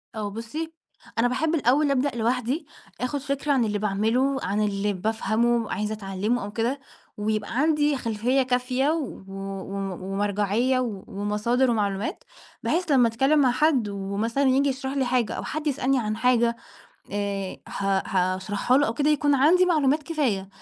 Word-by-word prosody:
آه، 210 Hz, -2 st, -3 dB
بُصّي، 265 Hz, +10 st, -5 dB, 0.5 s
أنا 235 Hz, -, +4 dB
بأحب 310 Hz, +6 st, 0 dB
الأول 285 Hz, +1 st, +3 dB
أبدأ 275 Hz, +1 st, +1 dB
لوحدي، 250 Hz, +6 st, 0 dB, 0.4 s
آخُد 265 Hz, +3 st, -1 dB
فكرة 280 Hz, +1 st, -2 dB
عن 260 Hz, -4 st, +3 dB
اللي 210 Hz, -1 st, -1 dB
باعمله، 225 Hz, +7 st, +1 dB
عن 200 Hz, +3 st, 0 dB
اللي 205 Hz, 0 st, 0 dB
بافهمه، 225 Hz, +3 st, 0 dB
عايزة 210 Hz, +2 st, -2 dB
أتعلَّمه، 205 Hz, +3 st, -2 dB
أو 205 Hz, -, -6 dB
كده. 235 Hz, +6 st, -1 dB, 0.4 s
ويبقى 215 Hz, +2 st, -2 dB
عندي 300 Hz, -1 st, +2 dB
خلفية 235 Hz, +3 st, 0 dB
كافية 255 Hz, +2 st, 0 dB
و 310 Hz, -10 st, -3 dB
و 195 Hz, -, -10 dB, 0.3 s
و 195 Hz, -1 st, -4 dB, 0.2 s
ومرجعية 205 Hz, +5 st, +1 dB
و 220 Hz, -7 st, -3 dB
ومصادر 210 Hz, +6 st, 0 dB
ومعلومات، 205 Hz, -2 st, -1 dB, 0.4 s
بحيث 340 Hz, -1 st, 0 dB
لمَّا 255 Hz, -4 st, +5 dB
أتكلَّم 270 Hz, +7 st, +2 dB
مع 260 Hz, -3 st, +4 dB
حد، 255 Hz, -4 st, +2 dB
ومثلًا 200 Hz, +6 st, -2 dB
ييجي 270 Hz, +1 st, +3 dB
يشرح 265 Hz, 0 st, -3 dB
لي 275 Hz, -2 st, 0 dB
حاجة، 245 Hz, -2 st, +1 dB
أو -, -, -4 dB
حد 310 Hz, 0 st, -4 dB
يسألني 270 Hz, -2 st, +1 dB
عن 215 Hz, -2 st, -2 dB
حاجة، 235 Hz, 0 st, +3 dB, 0.6 s
آآ، 200 Hz, -2 st, -2 dB
ه 195 Hz, -1 st, 0 dB
هاشرحها 190 Hz, +5 st, +1 dB
له 290 Hz, -, +3 dB
أو 225 Hz, -, -2 dB
كده، 290 Hz, +4 st, +2 dB
يكون 290 Hz, -1 st, +3 dB
عندي 320 Hz, +7 st, +5 dB
معلومات 305 Hz, -3 st, +2 dB
كفاية. 265 Hz, -, -1 dB
240 Hz, 160 wpm, -25 LUFS, 210-275 Hz, 0.6 s, لمَّا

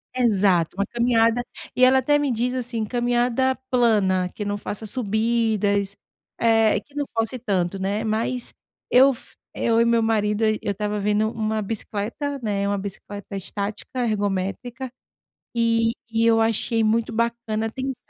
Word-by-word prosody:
exato, 195 Hz, -9 st, +2 dB
uma 200 Hz, -, +1 dB
caminhada. 235 Hz, +1 st, +2 dB, 0.3 s
E 255 Hz, -, +3 dB
ela 260 Hz, +1 st, +5 dB
até 290 Hz, +3 st, +3 dB
me 290 Hz, -2 st, 0 dB
diz, 245 Hz, +2 st, 0 dB
assim, 240 Hz, -3 st, -2 dB
caminhada 245 Hz, +3 st, +1 dB
plana, 205 Hz, -7 st, +2 dB
que 210 Hz, -, -5 dB
não 205 Hz, 0 st, -2 dB
faça 205 Hz, +1 st, -6 dB
subidas, 215 Hz, -3 st, 0 dB, 0.4 s
eh, 225 Hz, -2 st, +4 dB
que 285 Hz, -, -26 dB
não 290 Hz, 0 st, -1 dB
force 225 Hz, +3 st, 0 dB
tanto. 195 Hz, -4 st, -1 dB
né. 200 Hz, +3 st, -1 dB
Mas 230 Hz, +3 st, -1 dB, 0.4 s
eu 270 Hz, +2 st, +7 dB
f 240 Hz, -, -8 dB, 0.2 s
eu 230 Hz, 0 st, +3 dB
e -, -, +4 dB
meu 235 Hz, -1 st, +3 dB
marido, 210 Hz, -1 st, +1 dB
eu 215 Hz, -1 st, +2 dB
eu -, -, -1 dB
estava 210 Hz, +1 st, -2 dB
vendo 210 Hz, +2 st, +1 dB
1 220 Hz, -1 st, -1 dB
bicicleta, 225 Hz, +7 st, -4 dB
né, 200 Hz, -2 st, 0 dB
1 200 Hz, 0 st, 0 dB
bicicleta 200 Hz, +1 st, -7 dB
estática, 205 Hz, +5 st, -3 dB
ergométrica, 215 Hz, +4 st, -2 dB, 0.6 s
e 230 Hz, -1 st, +2 dB, 0.2 s
e 225 Hz, 0 st, +1 dB
eu 225 Hz, 0 st, +4 dB
achei 225 Hz, +1 st, +1 dB
muito 225 Hz, +2 st, +1 dB
bacana 230 Hz, -1 st, -1 dB
tentar. 265 Hz, +2 st, -4 dB
225 Hz, 150 wpm, -23 LUFS, 205-240 Hz, 0.6 s, eu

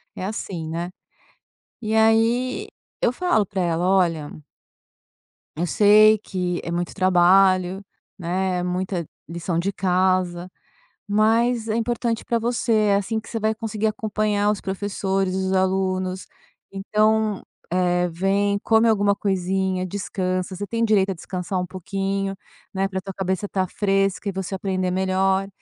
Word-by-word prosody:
é 185 Hz, -, -4 dB
assim, 190 Hz, -5 st, -4 dB
né. 170 Hz, +2 st, -3 dB, 0.9 s
E 220 Hz, -1 st, -2 dB
aí 230 Hz, -, +2 dB, 0.3 s
eu 240 Hz, -, +2 dB
falo 350 Hz, -, +1 dB
pra 195 Hz, 0 st, -4 dB
ela: 170 Hz, -1 st, 0 dB
"Olha" 170 Hz, -6 st, +2 dB, 1.3 s
"eu 170 Hz, +3 st, -1 dB
sei 215 Hz, +4 st, +6 dB
que 180 Hz, -3 st, -3 dB
é -, -, -4 dB
muito 175 Hz, +1 st, -3 dB
trabalho, 185 Hz, 0 st, +4 dB, 0.3 s
né, 185 Hz, +1 st, -1 dB
é -, -, -2 dB
muita 180 Hz, -1 st, -2 dB, 0.2 s
lição 170 Hz, 0 st, -3 dB
de 185 Hz, +4 st, 0 dB
casa, 185 Hz, -1 st, 0 dB, 0.6 s
mas 225 Hz, +3 st, +2 dB
é 215 Hz, -, 0 dB
importante 235 Hz, 0 st, -1 dB
pra 235 Hz, -, +1 dB
você, 235 Hz, +1 st, -1 dB
é 210 Hz, -2 st, +3 dB
assim 220 Hz, +3 st, -2 dB
que 225 Hz, -, -14 dB
você 225 Hz, -, -3 dB
vai 220 Hz, 0 st, 0 dB
conseguir 220 Hz, -1 st, -2 dB
acompanhar 210 Hz, -1 st, 0 dB
os 210 Hz, -, -3 dB
professores 195 Hz, -1 st, -2 dB
e -, -, -1 dB
os 190 Hz, 0 st, -1 dB
alunos. 185 Hz, 0 st, 0 dB, 0.5 s
Então, 215 Hz, +1 st, +1 dB, 0.3 s
eh, 180 Hz, 0 st, +2 dB
vem, 200 Hz, +4 st, +1 dB
come 225 Hz, +2 st, +3 dB
alguma 205 Hz, -2 st, +3 dB
coisinha, 190 Hz, -1 st, -1 dB
descansa, 185 Hz, -1 st, -3 dB
você 205 Hz, +2 st, -5 dB
tem 230 Hz, +4 st, -1 dB
direito 200 Hz, -3 st, +3 dB
a -, -, -1 dB
descansar 180 Hz, +2 st, -4 dB
um -, -, -2 dB
pouquinho, 195 Hz, +2 st, -3 dB, 0.4 s
né, 195 Hz, 0 st, 0 dB
pra 190 Hz, -1 st, -3 dB
tua 195 Hz, +1 st, -7 dB
cabeça 190 Hz, +1 st, -2 dB
estar 190 Hz, -2 st, -1 dB
fresca 195 Hz, 0 st, 0 dB
e -, -, 0 dB
você 190 Hz, 0 st, -4 dB
aprender 185 Hz, -1 st, -1 dB
melhor" 190 Hz, +1 st, +1 dB
195 Hz, 150 wpm, -23 LUFS, 185-215 Hz, 1.3 s, sei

